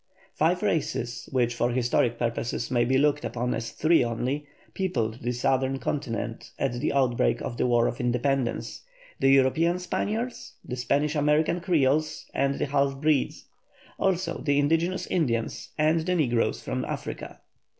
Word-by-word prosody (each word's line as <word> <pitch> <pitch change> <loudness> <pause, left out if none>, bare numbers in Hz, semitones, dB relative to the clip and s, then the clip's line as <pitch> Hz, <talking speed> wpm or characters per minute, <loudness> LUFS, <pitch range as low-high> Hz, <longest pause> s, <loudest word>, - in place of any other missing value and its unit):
Five 175 +5 +1
races, 120 - -1
which 120 -2 +1
for 120 +1 0
historic 120 -1 +1
purposes 120 +1 -2
may 120 -1 +3
be 130 +2 +2
looked 145 +1 +2
upon 125 +1 -2
as 115 0 -3
three 160 -3 +3
only, 125 +5 -2 0.3
peopled 120 - -1
the 120 - -1
Southern 130 +2 +1
Continent 120 -5 -3
at 135 -3 0
the 120 - -1
outbreak 130 -4 +2
of 120 - -5
the - - +1
War 120 -1 +3
of 120 - -2
Independence: 125 +1 -1 0.4
the 135 - +4
European 135 +6 +4
Spaniards, 220 +6 -3
the 125 - -4
Spanish 140 +4 0
American 150 +3 +2
Creoles, 155 -3 +1
and 140 0 +1
the - - 0
half 140 -1 0
breeds; 150 -2 +1 0.5
also 185 -3 0
the 145 -2 +1
indigenous 165 +5 +1
Indians, 115 -8 -1
and 155 +1 +3
the 180 +3 0
negroes 120 -8 +1
from - - -2
Africa. - - -6
135 Hz, 150 wpm, -26 LUFS, 120-155 Hz, 0.5 s, the